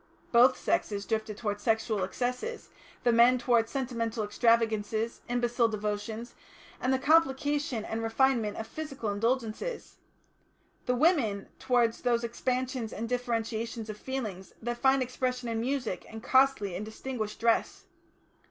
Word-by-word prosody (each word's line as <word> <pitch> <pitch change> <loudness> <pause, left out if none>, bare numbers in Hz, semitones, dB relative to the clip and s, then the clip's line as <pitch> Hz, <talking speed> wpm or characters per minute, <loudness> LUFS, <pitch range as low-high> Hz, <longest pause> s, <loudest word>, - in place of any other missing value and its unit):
Both 250 +2 +6
sexes 200 -1 -1
drifted 220 -2 -2
towards 205 -2 -3
sexual 220 -3 +1
excesses, 250 - -3 0.3
the 240 - +4
men 240 +2 +6
towards 235 -2 +2
sentimental 235 -4 -2
extravagances, 225 0 +1
imbecile 240 -1 +2
devotions, 215 +2 -4 0.5
and 255 - +1
the 265 - +3
complication 285 -4 +2
and 225 +1 -3
refinement 225 -2 +1
of 220 - -4
physical 275 -4 -4
indulgences; 230 - -2 0.9
the 250 - +2
women 245 - +2
towards 240 -3 +2
those 240 -1 +1
expansions 250 0 -2
and 230 +2 -4
differentiations 230 -2 -2
of 210 - -10
feeling 225 -8 -4 0.2
that 240 +1 -4
find 265 0 +4
expression 250 0 -2
in 225 -1 -1
music 250 -5 -2
and 220 0 -9
costly 260 -8 +3
and 190 - -3
distinguished 220 0 -5
dress. 230 0 +1
235 Hz, 130 wpm, -29 LUFS, 220-255 Hz, 0.9 s, Both